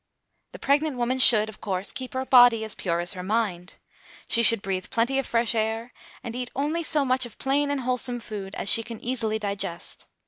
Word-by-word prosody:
The - - -8
pregnant 285 0 0
woman 245 +2 -1
should, 220 -4 +5
of 220 - -11
course, 190 0 -3
keep 260 -1 -8
her 260 0 -2
body 245 -3 +5
as 220 - -6
pure 170 -2 -2
as 175 +2 -1
her 185 - -7
mind. 195 -3 -3 0.5
She 235 - +1
should 230 -2 +7
breathe 190 -1 -4
plenty 260 +2 0
of 270 - -3
fresh 230 -1 0
air, 225 +2 -3 0.3
and 235 0 -7
eat 250 0 -5
only 300 +5 -1
so 300 -3 +3
much 255 0 +1
of 225 - -17
plain 285 +2 0
and 285 -2 -2
wholesome 250 -1 0
food 205 -4 -8
as - - -4
she 230 - +4
can 230 -1 -9
easily 230 -3 -2
digest. 200 -5 -4
230 Hz, 210 wpm, -24 LUFS, 210-260 Hz, 0.5 s, should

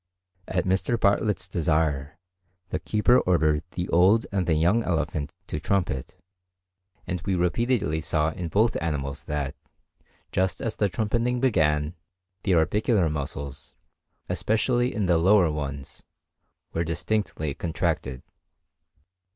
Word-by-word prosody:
At 90 -2 -1
Mr. 95 +5 +1
Bartlett's 100 -1 +1
desire 80 -5 0 0.5
the - - -2
keeper 115 +4 +3
ordered 80 -4 +2
the 90 0 -2
old 95 +7 +4
and 95 -3 0
the 80 - +3
young 90 +9 +3
elephant 75 -6 -2
to 75 - -4
trumpet; 85 -7 -1 0.9
and 90 -1 -3
we 95 +1 -1
repeatedly 90 - +1
saw 80 -1 +1
in 85 +2 -5
both 110 +7 +2
animals 70 -3 -2
that, 70 -2 -3 0.8
just 95 0 0
as 115 - -3
the 105 - +2
trumpeting 115 +4 0
began, 75 - +2 0.5
the 95 - +2
orbicular 90 +1 +2
muscles, 70 -1 -5 0.5
especially 120 +3 +1
the 90 -8 +1
lower 95 -1 +5
ones, 70 -2 -6 0.7
were 85 - 0
distinctly 85 -3 -2
contracted. 65 -5 -2
85 Hz, 120 wpm, -26 LUFS, 75-105 Hz, 0.9 s, lower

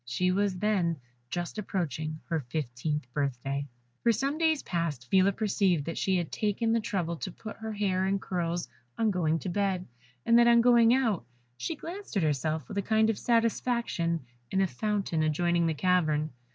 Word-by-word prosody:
She 150 +10 0
was 195 0 +1
then 180 -5 +1 0.3
just 175 +7 -3
approaching 155 -5 -3
her 165 -2 -1
fifteenth 145 +1 -3
birthday. 140 0 -2 0.3
For 235 - +4
some 275 +7 -1
days 320 -3 +2
past, 165 -8 -2
Phila 190 +1 +5
perceived 195 -7 +1
that 165 - -4
she 190 -1 +2
had 175 -3 -3
taken 225 +2 0
the 230 - +3
trouble 190 -7 -2
to 185 - -5
put 220 +4 -9
her 220 0 -5
hair 190 -3 0
in 195 +1 +1
curls 175 -2 -2 0.3
on 220 -2 +2
going 165 -4 +1
to 185 - -4
bed, 190 -1 0 0.4
and 230 +1 +6
that 235 - +6
on 235 0 +6
going 235 -1 +6
out 235 - +2 0.3
she 330 - -3
glanced 350 - -6
at 185 - +2
herself 155 -1 0
with 200 - -3
a - - +1
kind 220 +2 +3
of 215 - -6
satisfaction 230 -7 +1 0.3
in 190 - 0
a 195 - +4
fountain 190 - -1
adjoining 170 +2 +2
the 160 - 0
cavern. 155 -3 +1
185 Hz, 180 wpm, -29 LUFS, 160-220 Hz, 0.4 s, and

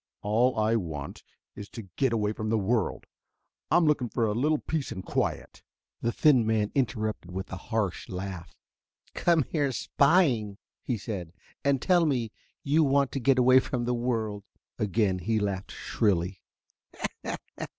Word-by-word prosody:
All 115 +5 +2
I 110 +1 +3
want 75 -7 -5 0.3
is 105 - -8
to 115 - -8
get 135 -3 +2
away 105 -2 0
from 110 0 -4
the 110 - +2
world. 110 +1 0 0.6
I'm 175 - +4
looking 145 -5 +2
for 115 - 0
a 105 - 0
little 150 +7 +2
peace 155 -1 -3
and 95 - -6
quiet." - - -2 0.4
The 115 - +1
thin 135 -3 +4
man 110 -2 +1
interrupted 110 -7 -1
with 95 +2 -6
a - - -3
harsh 110 -6 -1
laugh. 95 -2 -6 0.6
"Come 170 -3 +3
here 145 -1 -1
spying," 130 - +2 0.2
he 125 - -2
said, 95 -6 -6 0.3
"and 140 -1 +2
tell 175 +3 +3
me 120 -6 0 0.3
you 150 +3 +3
want 140 -2 +2
to 135 - -2
get 135 +1 +3
away 130 +1 +6
from 125 -2 -2
the 125 - 0
world." 115 -4 -2 0.4
Again 100 -2 +1
he 110 +5 0
laughed 100 -2 -2
shrilly. 95 -3 -1
115 Hz, 155 wpm, -28 LUFS, 100-135 Hz, 0.6 s, away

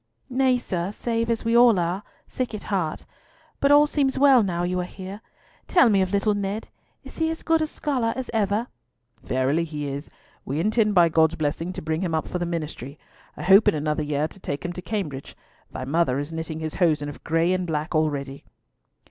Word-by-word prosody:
"Nay, 255 0 +3
sir, 185 -6 -3
save 230 +1 -2
as 230 0 -1
we 230 +1 +2
all 240 -3 +6
are—sick 195 +7 -4
at 210 - -7
heart! 180 -6 -2 0.5
But 280 - +3
all 290 +1 +7
seems 280 -3 0
well 270 -3 +6
now 175 -4 -1
you 180 +1 -1
are - - 0
here. 190 +3 -8 0.5
Tell 345 -10 +5
me 200 -3 +3
of 185 -1 0
little 205 +1 +2
Ned. 205 +2 -3 0.3
Is - - -11
he 320 0 +2
as 325 - -5
good 320 -1 +2
scholar 255 -8 -1
as 260 -1 -4
ever?" 210 +1 +1 0.6
"Verily 130 +6 0
he 150 -3 -5
is. 140 +2 -5 0.3
We 140 +3 -3
intend 215 +2 +2
by 170 -2 +6
God's 160 0 +3
blessing 160 +3 -2
to - - -7
bring 160 +1 -1
him 170 -4 -1
up 160 - -2
for 180 - -3
the 175 - -2
ministry. 155 -5 -5 0.4
I - - -6
hope 195 +4 +6
in - - +4
another 150 +1 -1
year 150 0 -1
to - - -14
take 145 -1 -5
him 175 - -3
to 180 - -7
Cambridge. 165 -8 -5 0.3
Thy 130 - -5
mother 145 -2 +1
is 145 +3 -4
knitting 160 -1 -5
his 155 -1 -3
hosen 150 -4 +2
of 145 - -9
gray 165 +2 +2
and 185 -1 -1
black 155 +1 -2
already." 145 -3 -1
180 Hz, 205 wpm, -24 LUFS, 155-225 Hz, 0.6 s, all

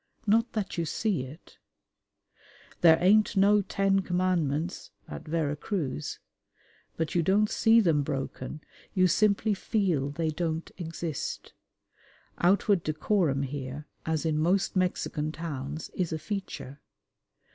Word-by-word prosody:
Not 225 +3 +2
that 205 -5 -3
you 165 - 0
see 175 - -1
it. 145 +6 -14 1.2
"There 160 -2 +7
ain't 205 +3 +4
no 205 +2 +5
Ten 195 0 +1
Commandments" 175 -3 -1 0.2
at - - -8
Vera 155 -2 0
Cruz; 145 - -3 0.8
but 160 -2 -2
you 175 - +3
don't 200 +5 +2
see 225 0 +5
them 165 -8 +3
broken: 140 0 -4 0.3
you 185 -1 +5
simply 210 +3 +3
feel 185 - 0
they 160 +2 -1
don't 160 0 -3
exist. 165 -3 -5 0.9
Outward 195 +1 +3
decorum 155 -2 +1
here, 140 +1 -5 0.2
as 160 0 -1
in 155 -1 +1
most 185 +6 +1
Mexican 180 -4 0
towns, 155 -2 -5
is 180 -3 -2
a 160 - -1
feature. 155 -6 -6
170 Hz, 125 wpm, -28 LUFS, 150-195 Hz, 1.2 s, There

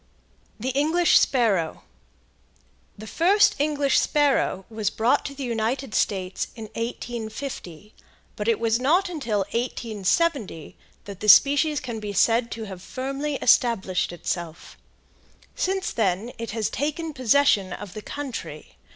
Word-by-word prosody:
THE 255 +4 -2
ENGLISH 320 +5 +4
SPARROW. 205 - +1 1.1
The 215 - -9
first 375 - +3
English 290 -2 +2
sparrow 280 -10 +1
was 215 -2 -2
brought 240 +7 +1
to 280 - -6
the 275 - -6
United 235 +1 -2
States 190 -2 -1
in 225 - -8
1850, 230 - -6 0.4
but 210 - -4
it 230 -2 +2
was 230 0 +1
not 345 +9 +2
until 240 - -2
1870 230 - -1 0.3
that 200 -2 -9
the 215 - 0
species 290 +5 +6
can 235 -3 -6
be 210 -1 -5
said 230 +4 +3
to 225 - -6
have 190 -4 -8
firmly 275 +6 -4
established 215 -9 +2
itself. 170 -1 -5 0.8
Since 380 0 -1
then 210 +1 -1
it 230 - -5
has 220 -1 -2
taken 310 +2 -3
possession 255 -6 +3
of 195 +1 -7
the 215 - -7
country. 210 - -7
230 Hz, 130 wpm, -24 LUFS, 205-280 Hz, 1.1 s, species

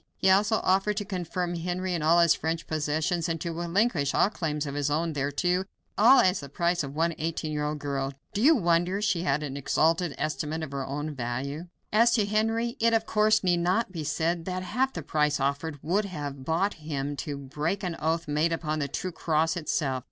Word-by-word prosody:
He 190 - +3
also 210 +3 +3
offered 195 +2 +2
to 205 - -2
confirm 180 -2 -3
Henry 180 +2 -2
in 170 - -1
all 160 +3 +4
his 170 -1 +6
French 165 +1 -3
possessions, 155 +3 -1
and 165 0 -2
to 170 +2 -3
relinquish 170 - 0
all 205 - +3
claims 150 -6 -2
of 140 - -4
his 145 0 -1
own 160 +2 0
thereto 165 +7 0 0.3
all 235 +6 +7
as 185 +1 +2
the 140 - -8
price 170 +4 0
of 140 -1 -6
one 165 +2 +1
eighteen 160 -1 -2
year 150 -1 -2
old 150 0 -2
girl. 140 -2 -2 0.2
Do 205 - -1
you 310 +6 +6
wonder 175 - +1
she 195 -5 +1
had 145 -2 0
an 140 -2 -5
exalted 160 +3 +1
estimate 155 +1 -2
of 150 - -6
her 140 -1 -3
own 150 +3 -4
value? 135 +6 -4 0.3
As 230 +2 +5
to 215 -3 +3
Henry, 225 +3 0
it, 230 0 +3
of 225 0 +1
course, 215 0 +3
need 180 -2 +3
not 185 +5 +1
be 165 -4 -5
said, 165 +3 -1
that 185 0 -3
half 255 +8 0
the 165 - -6
price 150 0 +1
offered 140 +3 -1
would 195 +7 +1
have 145 -7 -6
bought 180 +7 +1
him 145 -2 -3
to 145 -2 -4
break 150 +8 -3
an 175 -3 -2
oath 160 +1 -1
made 150 +3 +1
upon 155 -2 -2
the 140 - -1
true 185 +6 -4
cross 160 0 0
itself. 150 -5 -1
165 Hz, 210 wpm, -27 LUFS, 150-185 Hz, 0.3 s, all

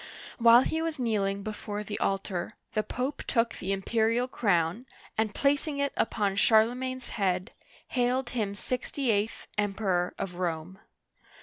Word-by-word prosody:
While 235 +1 +8
he 320 +3 -1
was 325 -1 -2
kneeling 200 -5 0
before 210 0 -4
the 210 0 -5
altar, 195 0 -1 0.2
the 215 - +2
Pope 255 +6 -3
took 230 -1 +2
the 190 - -4
imperial 225 +5 +1
crown, 200 0 +1 0.3
and 215 -1 0
placing 285 +1 +1
it 280 0 0
upon 200 -3 0
Charlemagne's 250 +4 +3
head, 185 -1 0 0.4
hailed 250 0 +1
him 210 -5 -1
sixty 255 +3 -1
eighth 210 +1 -1
Emperor 195 -3 0
of 180 -2 -4
Rome. 175 +1 -3
220 Hz, 135 wpm, -29 LUFS, 195-250 Hz, 0.4 s, While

